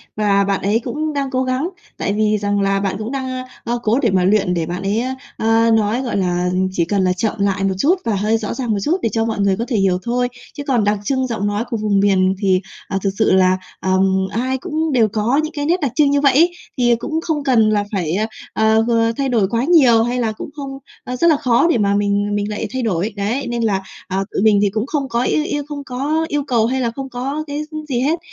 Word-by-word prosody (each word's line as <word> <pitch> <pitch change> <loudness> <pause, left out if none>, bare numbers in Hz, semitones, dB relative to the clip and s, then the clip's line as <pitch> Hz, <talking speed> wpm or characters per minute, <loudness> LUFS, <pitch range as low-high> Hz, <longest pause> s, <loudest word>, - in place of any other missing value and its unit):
và 200 -2 +2
bạn 195 -1 -1
ấy 205 +4 +1
cũng 305 +5 -3
đang 275 -2 -2
cố 260 -1 0
gắng. 260 +6 -1 0.3
Tại 200 - -1
vì 215 0 +2
rằng 205 0 0
là 195 0 +1
bạn 195 -1 -1
cũng 215 +3 -5
đang, 270 -1 -3
a, 255 0 -4 0.2
a, 235 - -1
cố 225 +4 +2
để 230 - +2
mà 185 -1 +2
luyện 195 -1 +2
để 170 -2 -1
bạn 180 +3 -5
ấy, 200 +3 0
a, 260 +1 -3 0.2
ờ, 225 +1 +3
nói, 220 +2 +2
gọi 245 -5 -2
là, 180 -1 0 0.2
chỉ 175 -3 0
cần 195 +2 0
là 185 0 +2
chậm 210 +4 -1
lại 195 -1 0
một 195 -1 +1
chút 310 - +3
và 225 - +1
hơi 210 +3 +1
rõ 215 -2 -4
ràng 250 -4 -3
một 210 - +1
chút 335 - +1
để 230 - +1
cho 225 -1 0
mọi 225 -2 -2
người 200 -1 +2
có 230 - -2
thể 240 - 0
hiểu 190 -2 +2
thôi. 245 +1 0 0.3
Chứ 285 - -6
còn 245 -5 +2
đặc 205 0 +1
trưng 260 +3 0
giọng 220 -4 -2
nói 205 +2 -1
của 235 - -2
vùng 210 -2 +1
miền 190 -1 +3
thì, 190 -2 +2 0.3
ờ, 195 - -2
thực 200 - +2
sự 220 - +3
là, 185 0 +4 0.2
ừm, 190 0 +2
ai 255 +4 -1
cũng 315 +2 -2
đều 235 -5 +4
có 215 +6 0
những 310 - -4
cái 290 -1 -3
nét 345 +4 +2
đặc 280 -5 0
trưng 290 0 +4
như 285 0 +2
vậy 275 -2 +4
ấy, 335 +6 +4 0.3
thì 240 -1 +3
cũng 315 +8 -3
không 315 -3 -2
cần 235 -5 +3
là 210 -1 +1
phải 175 -6 -1
à, 215 +3 0 0.3
ờ, 220 0 +3
ờ, 230 -1 +2
thay 275 -1 0
đổi 225 -6 +2
quá 230 +2 0
nhiều, 260 -8 +5
hay 245 +2 -1
là 225 -2 0
cũng 215 - -8
không 275 -2 -6 0.2
ờ, 250 - -4
rất 335 +7 +2
là 315 -3 +5
khó 255 +1 +3
để 300 - +3
mà 200 -2 +2
mình 205 0 0
mình 205 0 -1
lại 215 +1 -3
thay 260 - -1
đổi. 205 -2 -1
Đấy, 215 +7 -2
nên 240 -1 -2
là, 200 -4 +1 0.3
à, 190 0 -2
tụi - - -1
mình 210 -1 +4
thì 205 - +3
cũng 215 +3 -2
không 285 -3 -2
có 235 +1 0
yêu 305 - +1
yêu 290 -1 -2
không 290 -1 -6
có 285 +5 -1
yêu 295 -2 -1
cầu 235 -4 +2
hay 260 +3 0
là 235 -2 0
không 270 -1 -5
có 270 +5 -3
cái, 290 +1 -3
ư, 310 - -5
gì 245 -3 0
hết, 305 +6 +1
225 Hz, 270 wpm, -19 LUFS, 200-265 Hz, 0.3 s, nhiều